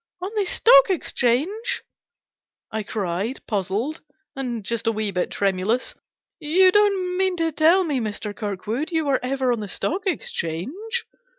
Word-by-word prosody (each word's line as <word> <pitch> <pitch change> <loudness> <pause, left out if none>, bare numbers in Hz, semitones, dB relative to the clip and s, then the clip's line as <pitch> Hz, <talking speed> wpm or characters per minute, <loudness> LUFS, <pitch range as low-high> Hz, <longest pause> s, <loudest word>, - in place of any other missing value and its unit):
" 365 - -52
On 380 - -3
the 415 -2 +1
Stock - - +6
Exchange! 375 - 0 0.4
" - - -68
I 220 - -2
cried, 205 +3 -3
puzzled, 210 - -2 0.3
and 240 -6 -4
just 230 +1 -2
a - - +4
wee 215 -2 -1
bit 180 -1 -1
tremulous. 200 +5 0 0.3
" - - -67 0.2
You 375 -1 +8
don't 385 -3 +2
mean 380 -1 +2
to 330 -1 +1
tell 325 +5 +4
me, 295 -6 -1
Mr. 210 -2 -4
Kirkwood, 215 +6 -3
you 320 -2 0
were 275 -2 +2
ever 260 0 0
on 235 - -3
the 210 - -5
Stock 370 - -2
Exchange 380 - -3
265 Hz, 165 wpm, -23 LUFS, -, 0.4 s, You